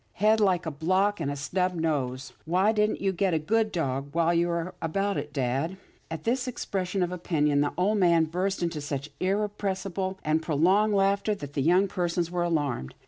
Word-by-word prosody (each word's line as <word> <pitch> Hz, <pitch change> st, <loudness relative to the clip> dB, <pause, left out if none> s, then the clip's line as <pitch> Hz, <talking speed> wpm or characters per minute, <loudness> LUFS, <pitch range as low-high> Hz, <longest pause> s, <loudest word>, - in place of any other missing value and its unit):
Head 215 Hz, +2 st, +3 dB
like 190 Hz, -5 st, +2 dB
a 160 Hz, -, -2 dB
block, 185 Hz, +7 st, +1 dB
and 150 Hz, -4 st, -2 dB
a 145 Hz, -, -2 dB
snub 180 Hz, +7 st, -1 dB
nose. 135 Hz, -6 st, -2 dB
Why 185 Hz, +6 st, +3 dB
didn't 210 Hz, -1 st, 0 dB
you 195 Hz, 0 st, +1 dB
get 185 Hz, -1 st, +1 dB
a -, -, +3 dB
good 215 Hz, +8 st, +1 dB
dog, 140 Hz, -4 st, -2 dB
while 170 Hz, 0 st, +3 dB
you 170 Hz, 0 st, +2 dB
were 170 Hz, +1 st, -2 dB
about 195 Hz, +5 st, -1 dB
it, 145 Hz, 0 st, -4 dB
dad? 140 Hz, +6 st, -1 dB, 0.2 s
" -, -, -35 dB
At 160 Hz, -1 st, -6 dB
this 250 Hz, +2 st, 0 dB
expression 195 Hz, -6 st, -2 dB
of 175 Hz, -, -2 dB
opinion, 150 Hz, -5 st, +1 dB
the 145 Hz, -, +1 dB
old 205 Hz, +4 st, +2 dB
man 170 Hz, -3 st, +4 dB
burst 180 Hz, +3 st, -2 dB
into 165 Hz, -3 st, -2 dB
such 145 Hz, 0 st, -4 dB
irrepressible 195 Hz, -1 st, -2 dB
and 155 Hz, +1 st, +1 dB
prolonged 185 Hz, +8 st, +2 dB
laughter 200 Hz, +2 st, +2 dB
that 145 Hz, -7 st, -8 dB
the 140 Hz, -, -1 dB
young 180 Hz, +7 st, +4 dB
persons 175 Hz, -3 st, -1 dB
were 180 Hz, -1 st, -1 dB
alarmed. 145 Hz, -, -1 dB
175 Hz, 195 wpm, -27 LUFS, 155-195 Hz, 0.2 s, man